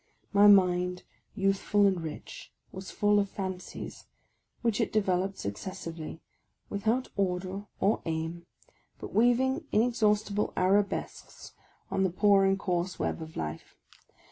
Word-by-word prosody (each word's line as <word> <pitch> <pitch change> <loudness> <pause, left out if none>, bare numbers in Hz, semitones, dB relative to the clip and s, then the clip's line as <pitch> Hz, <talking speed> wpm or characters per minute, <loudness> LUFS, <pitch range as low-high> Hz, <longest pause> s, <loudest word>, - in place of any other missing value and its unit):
My 205 +1 +7
mind, 180 -2 +4 0.3
youthful 195 +1 +2
and 190 -3 +2
rich, 160 -2 -8 0.2
was 190 0 -8
full 205 0 +3
of 200 -1 0
fancies, 190 -2 -6 0.6
which 230 -1 +1
it 225 - 0
developed 195 -2 0
successively, 160 - -6 0.5
without 220 +5 0
order 190 +1 -2
or 205 +3 +2
aim, 165 +1 -4 0.5
but - - -9
weaving 260 +6 +3
inexhaustible 210 -3 +1
arabesques 200 +2 -1 0.4
on 195 - 0
the 190 - +2
poor 195 +2 +4
and 195 0 +3
coarse 180 -1 -2
web - - -2
of 160 0 -9
life. 75 -1 -5
195 Hz, 120 wpm, -29 LUFS, 180-205 Hz, 0.6 s, My